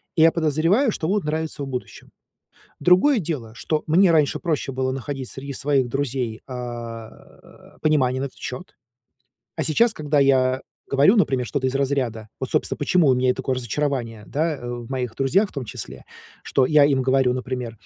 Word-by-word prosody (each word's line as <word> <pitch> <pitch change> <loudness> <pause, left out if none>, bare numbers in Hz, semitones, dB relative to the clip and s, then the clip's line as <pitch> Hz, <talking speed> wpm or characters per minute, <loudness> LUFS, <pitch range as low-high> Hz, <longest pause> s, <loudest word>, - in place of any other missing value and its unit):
и 160 - +2
я 165 +1 +7
подозреваю, 165 - +2
что 160 - -3
будут 200 +3 +1
нравиться 155 -1 -3
в - - -5
будущем. 125 -2 -7 0.7
Другое 185 - +5
дело, 140 - -5
что 155 +6 -2
мне 175 +4 +5
раньше 155 -3 +2
проще 155 -6 -2
было 130 0 -1
находить 135 -1 -5
среди 140 +1 -7
своих 135 -2 0
друзей, 125 -3 -2
а, 120 -3 -6 0.7
э, - - -25
понимание 130 -4 +2
на - - -1
этот 130 - -13
счёт. 130 +9 -7 0.8
А - - -1
сейчас, 230 +9 +3
когда 150 -1 0
я 130 -1 +3 0.3
говорю, 140 +11 +5
например, 130 - +2
что-то 135 -1 -1
из 130 - -1
разряда 130 -6 -1
Вот, - - -4
собственно, - - 0
почему 175 -5 +2
у 130 - +5
меня 125 0 +2
и - - +4
такое 130 +1 -2
разочарование, 120 -3 -3
да, 155 0 -1
в 120 -1 -6
моих 125 -4 -3
друзьях 180 +11 +2
в - - -18
том 140 -3 -4
числе. - - -8 0.4
Что 130 - +2
я 150 -1 +5
им 140 -2 +3
говорю, 130 -1 +3
например: 125 -3 -4
135 Hz, 180 wpm, -23 LUFS, 125-155 Hz, 0.8 s, я